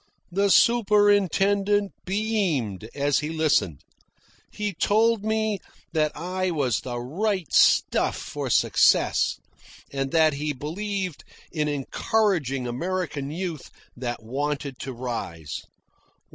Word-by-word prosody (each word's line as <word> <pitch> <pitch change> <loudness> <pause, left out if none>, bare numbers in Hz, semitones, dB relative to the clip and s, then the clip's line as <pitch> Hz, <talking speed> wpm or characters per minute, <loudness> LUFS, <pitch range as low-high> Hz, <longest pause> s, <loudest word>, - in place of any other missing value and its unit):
The 200 +3 +2
superintendent 205 -2 +3
beamed 180 - -1
as 145 0 +2
he 150 - -3
listened. 155 - +1 0.7
He 210 -1 -3
told 220 +4 +2
me 220 -1 0 0.3
that 155 -2 +2
I 185 +3 -2
was 140 -9 0
the 120 -1 -5
right 180 - -2
stuff - - +4
for - - -5
success, - - +3 0.6
and 135 0 -1
that 160 -2 +4
he 150 +1 -2
believed 185 +5 -4 0.3
in 155 -2 -1
encouraging 145 - 0
American 150 +2 -3
youth 165 -2 -5 0.3
that 120 -2 -4
wanted 140 +2 -3
to 135 - -5
rise. 115 - -5
160 Hz, 105 wpm, -25 LUFS, 135-200 Hz, 0.7 s, stuff